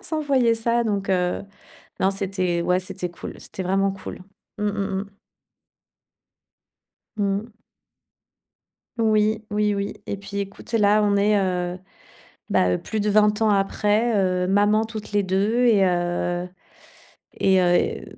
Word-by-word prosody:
on - - -22
s'envoyait 275 -7 +1
ça 235 +1 0
donc 200 -2 -1
heu, 180 -1 0 0.6
non, 190 - +2
c'était 185 -3 -1
ouais, 180 +1 +2
c'était 185 -1 -5
cool, 170 - -8
c'était 190 - -7
vraiment 195 +2 +1
cool. 195 -1 -8 0.4
Mmh, 210 - -2
mmh, 200 -1 -2
mmh. 200 0 -21 2.0
Mmh. 205 +2 -1 1.5
Oui, 215 -1 +2
oui, 210 0 +1
oui, 200 0 -3
et 200 - -4
puis 200 +1 -6
écoute, 200 +3 -7
là, 210 -1 +4
on 205 -1 +2
est, 205 +1 +3
heu, 180 -1 -2 0.7
bah, 90 0 +2
plus 220 - -4
de 210 +1 +1
20 210 +1 +3
ans 220 - +4
après, 210 +3 +1
heu, 185 -2 +1
maman 205 +3 +3
toutes 215 -2 -8
les 205 - +2
2 200 +6 +1
et 205 -5 +5
heu, 175 0 -1 0.9
et 190 -1 +4
heu 175 0 +1
200 Hz, 140 wpm, -23 LUFS, 185-215 Hz, 2.0 s, et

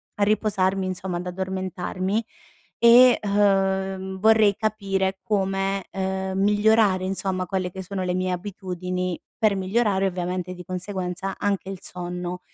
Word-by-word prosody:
a 205 - +1
riposarmi 195 -2 +1
insomma 185 -1 -3
ad 175 - -5
addormentarmi 190 +2 -2 0.6
e, 240 +1 +7
uhm, 195 -2 +1
vorrei 220 -1 +5
capire 195 -3 -1
come, 195 -1 0
uhm, 190 0 -2
migliorare 205 -1 +3
insomma 190 -1 -2
quelle 185 0 -2
che 190 +1 -7
sono 190 +1 -4
le 180 - 0
mie 185 0 0
abitudini, 180 -1 -4 0.2
per 215 -2 +3
migliorare 195 0 +1
ovviamente 180 0 -3
di 180 0 -10
conseguenza 185 0 -4
anche 200 -2 -1
il 195 - -6
sonno. 180 0 -5
190 Hz, 130 wpm, -24 LUFS, 185-200 Hz, 0.6 s, e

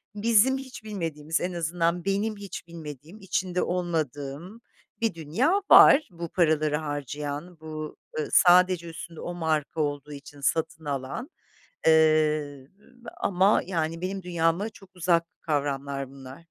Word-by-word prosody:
bizim 230 +5 +4
hiç 260 -4 -9
bilmediğimiz, 165 -6 -3
en 180 0 -2
azından 170 +1 -1
benim 205 +2 0
hiç 200 -3 -8
bilmediğim, 160 - -10
içinde 185 -1 -1
olmadığım 165 - -3 0.4
bir 225 -5 +1
dünya 230 - +1
var, 290 -3 +8
bu 170 -1 -6
paraları 155 -3 +2
harcayan; 145 +2 -5
bu, 155 -1 -7 0.2
ııı, 150 - -2
sadece 180 -1 +5
üstünde 165 0 -9
o 175 - -5
marka 160 -2 -1
olduğu 145 0 -3
için 140 0 -12
satın 160 +2 -1
alan. 140 - -4 0.6
Eee, 155 -3 +3 0.5
ama, 190 +2 +3
yani, 165 -2 -2
benim 190 0 -3
dünyama 170 +4 0
çok 195 -3 -17
uzak 170 -1 +2 0.2
kavramlar 140 -3 -2
bunlar. 135 -1 -11
165 Hz, 125 wpm, -26 LUFS, 150-185 Hz, 0.6 s, var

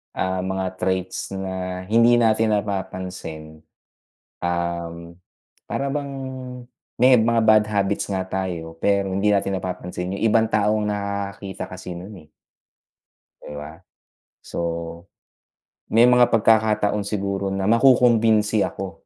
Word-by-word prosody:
ah, 95 0 -1
mga 95 0 -2
traits 95 -1 -2
na 95 -1 -4
hindi 115 +2 +5
natin 110 -1 +3
napapansin, 90 -6 -5 0.8
um, 85 -1 -3 0.5
para 140 - -2
bang, 140 -1 -3 0.9
may 125 -1 +6
mga 115 +1 +2
bad 110 -1 +5
habits 100 -1 0
nga 95 -2 -2
tayo 85 -4 -4
pero 100 0 +1
hindi 100 +2 0
natin 100 -1 0
napapansin 90 0 -5
yung 100 - -5
ibang 110 0 +3
tao 105 0 +1
ang 105 - -1
nakakakita 100 -1 -4
kasi 90 0 -8
no'n, 95 +4 -9
eh. - - -38 1.1
Di 75 - -9
ba? 75 +3 -9 0.6
So, - - -7 1.3
may 120 +2 +6
mga 125 -1 +5
pagkakataon 105 -2 +3
siguro 100 -1 -2
na 95 +1 -1
makukumbinsi 115 -3 +4
ako 95 -1 -7
100 Hz, 120 wpm, -22 LUFS, 95-110 Hz, 1.3 s, may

